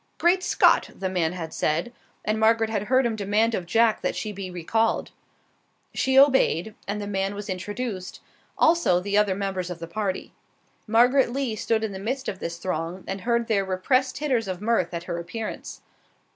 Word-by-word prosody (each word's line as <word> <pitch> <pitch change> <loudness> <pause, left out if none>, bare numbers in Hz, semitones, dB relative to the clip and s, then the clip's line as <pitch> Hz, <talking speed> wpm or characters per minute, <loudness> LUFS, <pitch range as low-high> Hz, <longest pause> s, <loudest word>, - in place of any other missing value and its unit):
"Great 360 +2 +3
Scott!" - - +3
the 190 - -3
man 175 -3 0
had 165 -3 -6
said, 165 +10 -1 0.3
and 215 +1 0
Margaret 225 0 +3
had 210 -2 -1
heard 260 +3 +3
him 230 -2 0
demand 215 +3 +1
of 180 -5 -3
Jack 225 +3 +3
that - - -1
she 215 - -3
be 195 -2 -6
recalled. 220 +6 0 0.8
She 265 0 +1
obeyed, 265 - +4
and 205 +1 -2
the 205 - -4
man 195 0 -2
was 205 0 -6
introduced, 200 +1 -5 0.4
also 320 - +4
the 200 +2 -2
other 205 -2 +3
members 190 -2 -3
of 180 - -5
the 165 - -6
party. 190 +2 -3 0.5
Margaret 245 +3 +4
Lee 260 -3 -2
stood 220 +1 0
in 220 - -2
the 190 - -6
midst 260 +7 -3
of 190 - -4
this 170 0 -4
throng 175 +1 -4
and 195 0 -4
heard 235 +1 0
their 205 -3 +2
repressed 195 +8 +1
titters 260 -7 0
of 185 -2 -4
mirth 210 -4 +1
at 170 -1 -4
her 170 -1 -4
appearance. 220 +6 -6
205 Hz, 185 wpm, -25 LUFS, 185-230 Hz, 0.8 s, obeyed